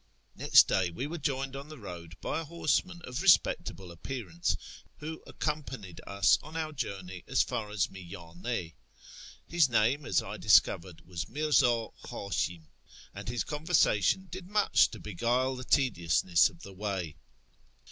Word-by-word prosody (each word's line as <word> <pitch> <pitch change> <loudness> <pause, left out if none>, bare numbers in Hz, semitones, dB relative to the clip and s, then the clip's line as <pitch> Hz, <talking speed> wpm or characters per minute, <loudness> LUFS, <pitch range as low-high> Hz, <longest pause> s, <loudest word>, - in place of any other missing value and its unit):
Next - - +6
day 95 -2 +1
we 85 +11 -4
were 165 +3 -5
joined 135 -2 -2
on 140 +2 -7
the 155 - -9
road 85 -6 -9
by - - -2
a - - -4
horseman 170 +2 -1
of 125 +2 -4
respectable 95 - +3
appearance, 85 -1 -3 0.4
who 160 +2 -7
accompanied 135 - -4
us 100 0 +4
on 155 +2 -8
our 155 -1 -2
journey 95 - -5
as - - +3
far 105 -2 -4
as 105 -3 +1
Miyane. 85 +1 -6 0.7
His 170 -5 +3
name, 120 +5 +2
as - - +3
I - - -6
discovered, 85 -1 +3
was 90 +2 -5
Mirzu 130 -7 +2
Htishim, 90 -4 -3 0.5
and - - -6
his 120 0 -1
conversation 155 - +2
did 185 0 -7
much 210 +1 +4
to - - -9
beguile 120 +6 0
the 130 - -6
tediousness 90 - +3
of 85 -4 -17
the 100 - -10
way. 95 -5 -3
115 Hz, 145 wpm, -30 LUFS, 90-150 Hz, 0.7 s, Next